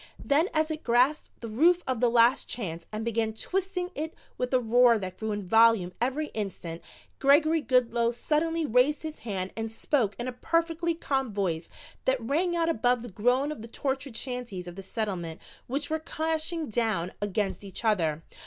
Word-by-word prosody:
Then 305 +6 +3
as 310 0 +1
it 310 0 -5
grasped 250 +6 +2
the 230 - -5
roof 335 +11 +3
of 260 -3 -1
the 245 0 +4
Last 240 +3 +4
Chance 170 -8 -4
and 215 +1 -4
began 225 -1 0
twisting 365 - -2
it 315 0 -4 0.2
with 250 - -2
a 255 - +4
roar 240 0 +5
that 185 -3 -6
grew 220 -1 -2
in 205 -1 -3
volume 225 -2 +4
every 270 +5 0
instant, 180 -5 -5 0.4
Gregory 310 +3 +4
Goodloe 240 -3 +2
suddenly 315 +7 0
raised 255 +5 +3
his 315 -1 -6
hand 190 -4 -3
and 225 0 -3
spoke 225 -3 0
in 240 - -4
a - - -2
perfectly 335 +4 0
calm 270 -6 -1
voice 180 -5 -2 0.4
that 260 0 +2
rang 320 +10 0
out 335 -1 +1
above 245 -5 +2
the 240 - -7
groan 245 +8 +1
of 300 - -7
the 225 - -8
tortured 265 0 -3
shanties 245 -8 -4
of 175 - -8
the 195 - -7
Settlement 185 -6 -4 0.3
which 285 +4 -2
were 315 - +1
crashing 320 0 -2
down 215 -7 0
against 205 0 -1
each 200 +4 -7
other. 165 -7 +1
245 Hz, 180 wpm, -28 LUFS, 215-305 Hz, 0.4 s, roar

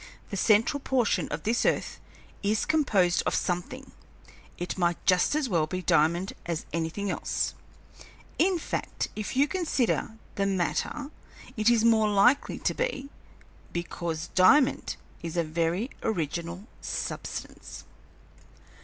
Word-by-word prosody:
The - - -2
central 220 +8 +3
portion 260 -5 +1
of - - -5
this 230 +3 +1
earth - - 0 0.4
is 210 +2 +1
composed 210 - +3
of - - +1
something; 220 +10 -3 0.7
it 175 - -3
might 175 -2 +1
just 185 +9 +3
as 305 -3 +1
well 165 -8 +1
be 185 +3 -4
diamond 170 +4 +2
as 170 -2 -3
anything 170 +5 -2
else. - - -1 0.9
In 365 +2 +3
fact, - - -3
if 215 +1 -4
you 280 +3 +4
consider 275 -10 0 0.2
the 200 0 +1
matter, 195 - -1 0.4
it 215 +1 +3
is 230 -1 +4
more 220 -2 +4
likely 240 +7 +3
to - - 0
be, 280 - -2 0.6
because 170 -1 -4
diamond 255 +9 +4 0.3
is 170 0 -5
a 170 - +3
very 170 - -1
original 170 -1 -3 0.2
substance. - - -5
200 Hz, 125 wpm, -28 LUFS, 175-255 Hz, 0.9 s, you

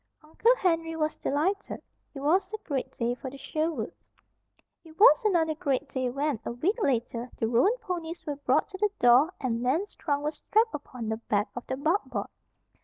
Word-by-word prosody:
Uncle 440 +11 +3
Henry 330 -4 0
was 310 -1 -1
delighted. 365 +9 -1 0.4
It 275 - -6
was 345 +9 +2
a 435 - -3
great 275 -4 -2
day 235 0 -1
for 260 +1 -7
the 275 - -10
Sherwoods. 310 -4 -3 0.7
It 320 -1 -16
was 305 -5 +7
another 335 -7 +2
great 285 -2 -1
day 255 -2 -1
when, 275 -1 -1
a - - -4
week 380 - 0
later, 240 - -1
the 225 - 0
roan 250 - +3
ponies 345 -6 -5
were 290 -3 -3
brought 285 - +2
to 380 -2 -9
the 420 - +3
door 245 +7 +6
and 235 -3 -1
Nan's 310 +12 0
trunk 285 -2 -2
was 300 +1 -2
strapped 450 +2 +2
upon 250 -6 -6
the 220 - -1
back 210 -2 -1
of 245 - -7
the 260 - -2
buckboard. 325 +8 0
300 Hz, 185 wpm, -28 LUFS, 250-345 Hz, 0.7 s, was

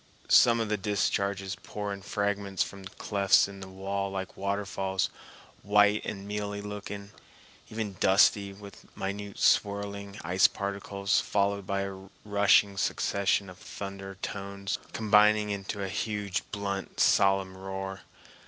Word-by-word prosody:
Some 115 -1 +6
of 115 - 0
the 105 0 0
discharges 100 -1 -1
pour 105 -1 -4
in 100 - -8
fragments 100 -1 -1
from 100 -1 -9
clefts 100 0 +3
in 100 -1 -10
the 95 - -8
wall 100 +1 -3
like 95 -1 -5
waterfalls, 95 -1 -1 0.5
white 105 +1 +4
and 100 -1 -5
mealy 105 0 -3
looking, 100 0 -7 0.6
even 110 -3 -4
dusty 100 +1 +4
with 100 0 -14
minute 100 +1 -4
swirling 100 0 +1
ice 95 +2 +5
particles, 100 0 -1
followed 100 -1 0
by 100 0 0
a 95 0 -6 0.2
rushing 100 -1 +4
succession 100 +1 +1
of 90 -1 -12
thunder 95 -1 -7
tones 100 0 -4
combining 105 -1 +4
into 100 0 -4
a - - -2
huge, 100 0 -3
blunt, 100 -1 -4
solemn 95 -1 +3
roar. 95 0 -5
100 Hz, 130 wpm, -29 LUFS, 95-100 Hz, 0.6 s, Some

